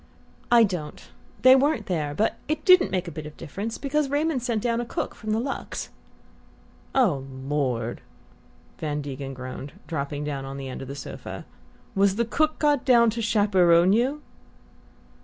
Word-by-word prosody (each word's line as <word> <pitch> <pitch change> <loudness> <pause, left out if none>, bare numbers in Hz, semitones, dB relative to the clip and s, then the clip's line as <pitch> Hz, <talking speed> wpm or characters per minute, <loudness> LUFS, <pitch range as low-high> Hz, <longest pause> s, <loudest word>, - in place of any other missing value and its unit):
"I 235 -1 +7
don't. 175 -8 -4 0.3
They 255 +1 +9
weren't 270 -4 +2
there. 150 -5 -2
But 220 - 0
it 305 0 -2
didn't 365 - +7
make 185 -1 -2
a - - -5
bit 155 -1 -7
of 150 - -12
difference, 200 +8 -5
because 285 0 0
Raymond 290 -1 0
sent 235 -3 -1
down 235 -1 +1
a - - -2
cook - - -3
from 215 - -8
the 215 +1 +1
Luxe." 270 +3 -4 1.1
"Oh, 185 - +3 0.2
Lord," 125 -6 -1 0.8
Van 150 -1 -2
Degen 135 -1 -6
groaned, 130 +2 -7
dropping 145 -2 -3
down 140 -2 -3
on 135 0 -6
the 135 -1 -6
end 130 - -6
of 135 - -7
the 140 - -6
sofa. 140 - -8 0.5
"Was 195 0 +3
the 235 +2 +1
cook 310 +7 +1
got 295 -3 +2
down 235 -3 +5
to 230 +1 -4
chaperon 190 -5 +4
you?" 265 +7 +1
200 Hz, 170 wpm, -25 LUFS, -, 1.1 s, They